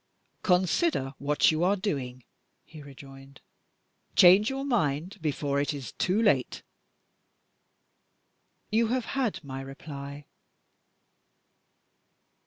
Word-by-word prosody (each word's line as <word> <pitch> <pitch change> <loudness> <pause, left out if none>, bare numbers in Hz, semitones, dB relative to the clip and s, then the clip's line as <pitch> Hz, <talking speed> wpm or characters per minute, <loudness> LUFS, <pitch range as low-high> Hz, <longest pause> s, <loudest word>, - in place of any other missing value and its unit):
"Consider 180 - +1
what 145 +2 +3
you 160 +2 -1
are 190 +3 +3
doing," 135 - -4 0.4
he 155 -2 -12
rejoined. 135 -1 -13 0.8
"Change 190 +4 +7
your 270 +1 -4
mind, 185 - -1
before 140 -2 -1
it 145 +1 -2
is 135 -4 -7
too 185 +4 0
late!" 175 - +1 2.1
"You 225 +1 +2
have 250 +1 -1
had 255 -11 -1
my 135 -1 -6
reply." 140 +1 -9
150 Hz, 95 wpm, -28 LUFS, 140-205 Hz, 2.1 s, Change